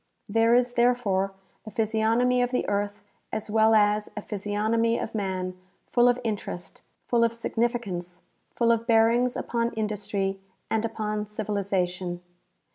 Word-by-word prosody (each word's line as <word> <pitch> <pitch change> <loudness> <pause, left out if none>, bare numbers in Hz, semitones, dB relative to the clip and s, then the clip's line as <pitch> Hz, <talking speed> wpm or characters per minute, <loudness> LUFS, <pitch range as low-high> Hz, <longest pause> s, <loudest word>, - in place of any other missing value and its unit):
There 225 +3 +4
is, 245 0 +2
therefore, 235 -6 +2 0.3
a 215 - -8
phj^si 220 -1 -1
ognomy 245 +3 +3
of 245 - 0
the 250 - -1
earth 205 0 -2 0.3
as 215 -1 -4
well 220 0 +5
as 210 0 +3
a 210 - -4
physiognomy 215 +3 0
of - - -4
man, 185 -3 -2 0.3
full 240 0 +3
of 245 0 +2
interest, 205 -5 -4 0.3
full 235 -1 +3
of 230 0 +1
significance, 225 -7 -2 0.3
full 235 -1 +3
of 230 0 0
bearings 235 +2 +4
upon 235 0 -1
industry 205 -3 -2 0.3
and 220 0 +1
upon 215 -1 -3
civilization. 190 -4 -2
220 Hz, 140 wpm, -26 LUFS, 205-230 Hz, 0.3 s, well